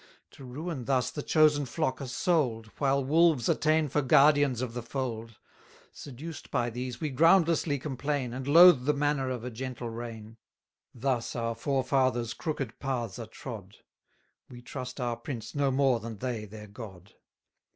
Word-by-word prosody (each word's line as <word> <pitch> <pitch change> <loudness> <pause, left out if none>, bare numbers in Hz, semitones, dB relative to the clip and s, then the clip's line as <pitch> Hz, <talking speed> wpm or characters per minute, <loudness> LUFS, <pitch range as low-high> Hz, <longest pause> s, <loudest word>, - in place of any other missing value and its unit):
To - - -14
ruin 135 +1 -5
thus 130 -2 +1
the 150 - -5
chosen 150 -2 +3
flock 130 0 -2
are 135 - -5
sold, 125 - 0
While 140 -1 +1
wolves 155 -3 +3
are - - +5
ta'en 155 0 +2
for 145 +2 0
guardians 140 -1 +4
of 125 -2 -3
the 120 - -4
fold; 115 -3 -5 0.5
Seduced 145 +4 -9
by 120 0 -1
these, 125 +1 -5
we 155 -2 -2
groundlessly 165 0 +3
complain, 135 -2 -3
And 130 +1 -5
loathe 165 -3 +8
the 150 +1 +2
manna 145 -2 0
of 125 -3 -4
a 125 - -5
gentle 125 0 -5
reign: 115 -1 -8 0.6
700 - - -30
Thus 130 -3 -1
our 115 -1 -1
forefathers' 130 -1 0
crooked 135 -7 -4
paths 125 -6 -3
are 115 - -6
trod 110 -6 -9 0.7
We 120 -1 -12
trust 125 +1 -7
our 120 -2 -2
prince 115 -2 -7
no 145 -1 +1
more 135 -2 +2
than 115 -1 -7
they 120 -2 -4
their 105 +1 -10
God. 100 -3 -11
130 Hz, 165 wpm, -29 LUFS, 115-145 Hz, 0.7 s, loathe